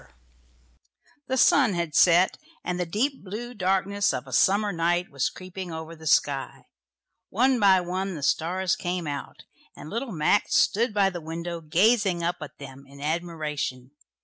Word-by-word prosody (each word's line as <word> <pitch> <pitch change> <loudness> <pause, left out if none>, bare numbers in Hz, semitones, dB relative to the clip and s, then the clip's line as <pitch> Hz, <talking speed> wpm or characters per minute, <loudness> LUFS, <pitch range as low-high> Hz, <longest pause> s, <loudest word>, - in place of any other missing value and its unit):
The 260 - -1
sun 255 -4 +5
had 170 -3 -2
set, 175 +5 +5 0.3
and 180 0 -3
the 180 - -1
deep 250 - -1
blue 225 +6 -6
darkness 195 - 0
of 130 - -5
a 130 - -10
summer 205 - +3
night 175 +1 0
was 135 -3 0
creeping 185 -1 -8
over 160 +1 -7
the 160 0 -9
sky. 140 -2 +1 0.6
One 250 +4 +2
by 195 -3 +5
one 185 +1 -3
the 145 - -7
stars 180 +5 0
came 175 -1 -3
out, 145 -2 -6 0.3
and 155 - -10
little 235 +2 -3
Max 170 +4 +1
stood 230 +4 +3
by 200 -2 +2
the 175 -2 -6
window 170 +2 -5
gazing 185 +2 +2
up 175 +1 -1
at 150 - -9
them 135 -1 -11
in 140 +1 -15
admiration. 150 -5 -3
175 Hz, 160 wpm, -26 LUFS, 160-200 Hz, 0.6 s, sun